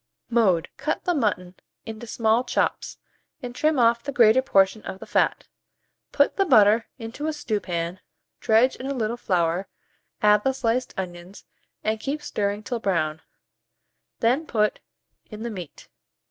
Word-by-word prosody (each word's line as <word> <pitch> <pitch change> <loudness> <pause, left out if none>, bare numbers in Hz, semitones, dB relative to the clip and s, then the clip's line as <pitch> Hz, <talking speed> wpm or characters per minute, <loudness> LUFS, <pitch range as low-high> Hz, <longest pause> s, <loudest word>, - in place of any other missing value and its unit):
Mode. 195 -8 +3
Cut 300 +3 -2
the 355 - +1
mutton 205 - -1 0.3
into 225 +1 -8
small 225 +1 +1
chops, 250 - -1 0.5
and 245 -1 -5
trim 305 +3 +1
off 235 -1 +3
the 280 - -5
greater 240 -1 +5
portion 195 -3 +2
of 190 -2 -7
the - - -10
fat; - - 0 0.6
put 285 - +2
the 395 - +4
butter 225 - +5
into 250 +5 -6
a 315 - -1
stewpan, 185 - -3 0.4
dredge 230 +4 +3
in 260 - -7
a 280 - -2
little 230 -1 -1
flour, 180 -4 0 0.6
add 210 0 +5
the 265 - +1
sliced 250 0 -1
onions, 180 0 -7 0.4
and 220 0 -1
keep 290 +5 -4
stirring 205 -5 -2
till 240 +2 -3
brown; 160 -7 -1 1.0
then 260 +8 +2
put 210 -2 +1 0.5
in 215 0 -8
the 235 - -4
meat. 180 -7 -9
220 Hz, 150 wpm, -24 LUFS, 195-255 Hz, 1.0 s, greater